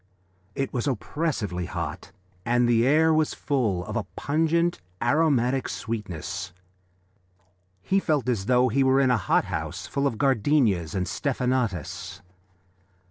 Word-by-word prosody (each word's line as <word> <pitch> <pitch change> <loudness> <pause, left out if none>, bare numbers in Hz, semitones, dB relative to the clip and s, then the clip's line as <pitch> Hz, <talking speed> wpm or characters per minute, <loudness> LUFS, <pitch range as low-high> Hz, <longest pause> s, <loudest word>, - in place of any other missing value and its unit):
It 135 - -2
was 125 +2 -1
oppressively 115 - -2
hot 85 +2 -5 0.3
and 120 0 +2
the 120 0 +3
air 160 +3 +4
was 155 -1 +1
full 110 -11 -1
of 105 - -6
a 115 -4 -1
pungent, 165 - +1 0.2
aromatic 135 -1 +2
sweetness. 90 -5 -5 1.3
He 195 - +2
felt 150 -8 0
as 110 -5 -1
though 125 0 +4
he 135 +4 +2
were 135 0 +4
in 130 -2 +3
a 125 - +3
hot 105 - +1
house - - -4
full 140 0 0
of 115 - -3
gardenias 115 - +2
and 90 -1 0
stephanotis. 125 - -2
125 Hz, 135 wpm, -25 LUFS, 105-140 Hz, 1.3 s, air